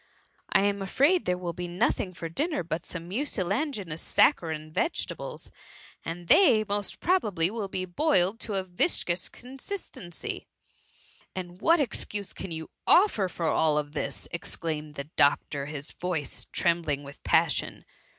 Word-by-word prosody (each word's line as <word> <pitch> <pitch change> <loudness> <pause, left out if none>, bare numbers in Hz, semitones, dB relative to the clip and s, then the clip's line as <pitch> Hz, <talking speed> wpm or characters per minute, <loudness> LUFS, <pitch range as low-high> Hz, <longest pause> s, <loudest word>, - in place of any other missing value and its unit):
I - - +5
am 200 0 +1
afraid 285 - +3
there 180 0 +1
will 175 -2 -4
be 175 +1 -4
nothii^ 185 0 0
for 165 - -4
dinner 295 - -1
but 165 0 -4
some 170 -1 -4
mucilaginous 200 - -1
saccharine 160 - +2
vegetables, 330 - -3 0.5
and 170 +1 -6
they, 225 - +6
most 205 -1 -2
probably, 205 - +2
will 220 -3 -3
be 185 -1 -2
boiled 195 - +2
to 210 - -4
a 190 - 0
viscous 180 - 0
consistency.^ 255 - -6
^^ - - -33 0.9
And 180 0 -6
what 335 +1 +5
excuse 210 -6 -2
can 190 - -6
you 160 -1 -6 0.2
offer 345 - +5
for 170 -1 -4
all 160 -1 +3
thisP^ 150 0 -2
exclaimed 155 -3 -3
the 140 - -3
doctor, 140 0 +2
his 145 0 -6
voice 175 -5 -3
trembling 165 -5 +1
with 140 0 -11
passion. 160 -3 +1
180 Hz, 140 wpm, -28 LUFS, 165-215 Hz, 0.9 s, they